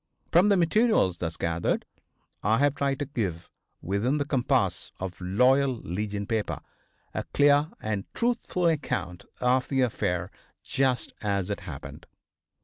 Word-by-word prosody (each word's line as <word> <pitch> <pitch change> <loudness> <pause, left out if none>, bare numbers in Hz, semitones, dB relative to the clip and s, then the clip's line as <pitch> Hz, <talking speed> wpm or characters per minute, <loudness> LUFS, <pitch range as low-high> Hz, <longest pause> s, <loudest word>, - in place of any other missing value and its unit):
From 180 +5 +5
the 200 - +5
materials 175 - +3
thus 85 -1 -3
gathered 85 0 0 0.6
I 110 +3 +3
have 145 +1 +3
tried 140 -1 0
to 145 - -2
give, 95 - -3 0.3
within 105 - +1
the 145 - 0
compass 135 -4 0
of 95 0 -6
a - - -6
Loyal 130 +8 +3
Legion 100 +1 -3
paper, 110 -2 -1 0.5
a - - -2
clear 145 +1 +5
and 105 -2 -3
truthful 235 -7 0
account 90 - -1
of 125 +1 +2
the 135 -2 +2
affair 90 -7 0 0.3
just 130 -3 0
as 100 -3 -1
it - - -2
happened. - - -9
125 Hz, 140 wpm, -27 LUFS, 95-145 Hz, 0.6 s, From